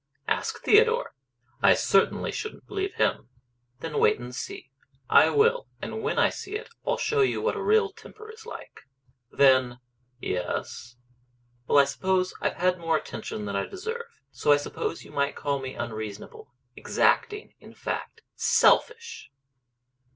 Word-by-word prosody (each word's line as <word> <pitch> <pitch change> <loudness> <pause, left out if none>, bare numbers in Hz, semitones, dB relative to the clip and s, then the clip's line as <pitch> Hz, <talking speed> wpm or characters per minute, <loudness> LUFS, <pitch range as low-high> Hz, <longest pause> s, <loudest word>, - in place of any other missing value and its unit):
"Ask 445 0 -2
Theodore." 460 +3 +4 0.5
"I - - +6
certainly - - +2
shouldn't 435 - -6
believe 390 -1 -3
him." - - 0 0.5
"Then 160 -2 -3
wait - - +4
and 125 +1 -8
see." 390 - -7 0.4
"I - - +7
will; 470 +3 +2
and 445 - -5
when 445 +2 -2
I - - +4
see 395 +2 -7
it 450 +2 -6
I'll - - 0
show 450 -3 +1
you 400 - +2
what - - 0
a - - -4
real 435 -1 +3
temper 435 +2 -13
is 445 0 -14
like." 455 - -11 0.4
"Then 130 -3 +4 0.2
" 125 0 -44
"Yes?" 120 +5 -4 0.7
"Well, - - +3
I 140 - +8
suppose 185 +6 0
I've - - -1
had 180 0 +1
more 165 -1 +1
attention 110 -5 -6
than 100 -1 -4
I 100 - -1
deserve. 465 +4 -7
So 150 - +1
I 145 - +7
suppose 145 - -4
you - - -14
might 140 0 -1
call 140 -1 -2
me 130 0 -6
unreasonable 110 - -7 0.2
exacting 420 -1 0
in - - -15
fact, 455 - -5
selfish!" 465 - +2
190 Hz, 155 wpm, -26 LUFS, -, 0.7 s, I